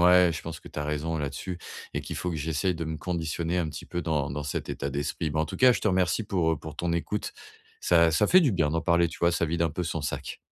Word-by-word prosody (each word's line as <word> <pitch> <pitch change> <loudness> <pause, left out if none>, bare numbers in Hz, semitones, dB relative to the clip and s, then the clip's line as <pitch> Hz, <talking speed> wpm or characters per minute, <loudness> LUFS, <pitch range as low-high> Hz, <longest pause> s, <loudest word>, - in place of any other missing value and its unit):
ouais, 90 -1 +6
je 80 - -4
pense 80 -1 -6
que - - -13
tu - - -7
as 75 - -1
raison 75 +2 -2
là-dessus 75 +6 -4 0.3
et - - -1
qu'il - - -6
faut 90 - -2
que 80 - -3
j'essaye 80 +4 0
de 80 -1 -4
me 80 0 -3
conditionner 85 0 -2
un 80 -3 0
petit 75 -1 -7
peu 85 - -3
dans 75 -5 0
dans 75 +2 -3
cet 75 - -3
état 70 - -3
d'esprit. 70 +3 -2
Ben, 75 +1 0
en 80 - +2
tout - - -7
cas, 130 -1 +7
je - - -2
te - - +3
remercie 95 +3 +2
pour, 90 -5 +1
heu, 80 - 0
pour 80 -1 -9
ton 85 -1 -1
écoute. 105 +5 -2 0.5
Ça 85 -1 +5
ça 105 +7 +3
fait 185 - +7
du 145 -9 +3
bien 80 -5 +2
d'en 80 +1 0
parler, 85 +1 +3
tu - - -10
vois, 85 0 +3
ça 85 - +1
vide 85 +1 -2
un 85 -2 +2
peu 90 +4 -3
son 80 -1 -2
sac. 75 - -4
80 Hz, 290 wpm, -27 LUFS, 75-90 Hz, 0.5 s, cas